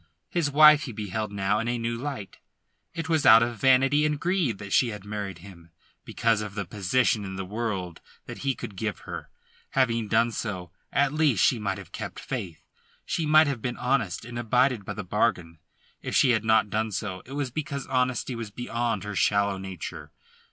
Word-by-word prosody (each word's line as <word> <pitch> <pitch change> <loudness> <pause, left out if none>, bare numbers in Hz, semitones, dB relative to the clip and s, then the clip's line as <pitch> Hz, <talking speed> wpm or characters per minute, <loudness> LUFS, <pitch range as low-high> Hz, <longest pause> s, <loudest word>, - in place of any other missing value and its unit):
His 170 -5 +1
wife 150 +1 +7
he 130 - -6
beheld 105 0 -4
now 100 +1 0
in 115 - -2
a 120 0 0
new 115 0 -2
light. 130 -5 -6 0.6
It 165 -1 -4
was 160 -2 +1
out 115 +1 +8
of 120 -2 -3
vanity 135 +3 +4
and 150 -1 0
greed 170 - 0
that 100 0 -6
she 125 - +4
had 105 -3 -7
married 105 -3 -5
him, 85 -4 -14 0.4
because 115 -2 +1
of 105 -2 -6
the 100 -2 -3
position 105 +4 +1
in 95 -1 -6
the 95 0 -4
world 95 -5 -4 0.2
that - - -8
he 135 -2 -1
could 100 - -8
give 105 +2 -3
her. - - -7 0.4
Having 115 -4 +1
done 115 +2 +2
so, 95 -7 -5 0.2
at 140 0 +2
least 150 - +3
she 120 - +2
might 100 -2 -2
have 100 -4 -11
kept - - -6
faith; 85 -4 -6 0.4
she 160 - -1
might 155 +1 +7
have 140 -6 -2
been 125 +1 -3
honest, 125 -8 -1
and 120 0 -6
abided 125 -1 +2
by - - -5
the 105 - -5
bargain. 90 -4 -1 0.4
If - - -4
she 130 - +5
had 110 -2 +1
not 110 -2 +3
done 110 +1 -1
so, 95 -2 -4
it 135 - -9
was 140 -3 -2
because 140 -1 -4
honesty 130 0 0
was 115 -2 -5
beyond 120 -1 -2
her 105 0 -5
shallow 100 0 +2
nature. 95 -2 -7
115 Hz, 200 wpm, -26 LUFS, 100-130 Hz, 0.6 s, out